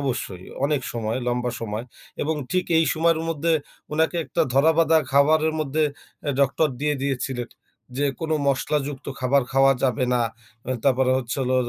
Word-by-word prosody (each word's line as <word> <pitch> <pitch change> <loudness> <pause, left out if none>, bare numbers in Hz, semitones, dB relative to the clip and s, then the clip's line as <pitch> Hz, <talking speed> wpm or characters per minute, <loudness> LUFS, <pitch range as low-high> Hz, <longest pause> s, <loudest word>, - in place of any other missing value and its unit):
অবশ্যই 100 -9 -3 0.2
অনেক 145 -1 +1
সময়, 115 0 -2
লম্বা 125 0 0
সময় 110 0 -4 0.4
এবং 160 +2 0 0.2
ঠিক 185 0 +1
এই 165 - +4
সময়ের 165 0 +2
মধ্যে 165 +1 0 0.4
উনাকে 160 +3 +1
একটা 130 - 0
ধরা 140 +4 +5
বাঁধা 160 0 +5
খাবারের 155 +3 +4
মধ্যে 155 +1 +1 0.4
অ্যা 145 - -1
ডক্টর 140 +3 +3
দিয়ে 150 0 +1
দিয়েছিলেন। 130 -3 -2 0.5
যে, 145 +1 +1
কোন 160 - -3 0.2
মশলা 140 +2 +1
যুক্ত 135 -3 -8
খাবার 135 +1 +3
খাওয়া 135 0 +5
যাবে 125 0 +1
না। 120 - +2 0.5
আ - - -1
তারপরে 130 -1 +3
হচ্ছে 125 -2 -4
হলো 130 0 0
140 Hz, 165 wpm, -24 LUFS, 125-155 Hz, 0.5 s, ধরা